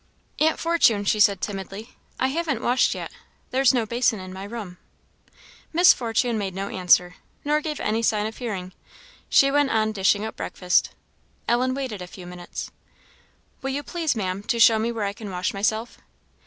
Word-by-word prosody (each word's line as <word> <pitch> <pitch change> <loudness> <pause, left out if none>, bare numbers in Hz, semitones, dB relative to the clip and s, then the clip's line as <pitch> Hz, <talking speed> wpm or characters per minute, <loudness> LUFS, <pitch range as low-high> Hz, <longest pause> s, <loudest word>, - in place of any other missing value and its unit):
"Aunt 315 +1 +3
Fortune," 285 -12 +2
she 215 - +1
said, 200 -2 +4
timidly, 200 +2 -6 0.3
"I 260 - +2
haven't 305 -4 -2
washed 250 +1 +2
yet - - -6 0.4
there's 265 0 +4
no 240 -3 0
basin 235 -1 +1
in 185 0 -8
my 190 +1 -7
room." 205 -5 -7 0.9
Miss 345 +1 +7
Fortune 230 -1 -1
made 190 -3 -4
no 195 +1 -3
answer, 180 -1 +3 0.3
nor 300 +1 +2
gave 305 -1 -4
any 220 +2 0
sign 215 -2 +1
of 220 0 -5
hearing; 190 -7 -5 0.6
she 275 0 +5
went 290 -1 +3
on 220 -2 +1
dishing 200 +1 +2
up 220 - -6
breakfast. 180 -1 0 0.6
Ellen 255 +2 +1
waited 255 -8 -4
a 180 - -7
few 180 0 -11
minutes. 175 0 -7 0.9
"Will 270 - -3
you 280 +2 -3
please, 330 -4 -1
Maam, 190 -2 -2
to 235 +3 -2
show 225 -1 +6
me 230 +2 0
where 225 -3 -2
I 200 - -2
can 210 -1 -8
wash 180 -1 -2
myself." 215 +3 -1
220 Hz, 180 wpm, -24 LUFS, 195-255 Hz, 0.9 s, Miss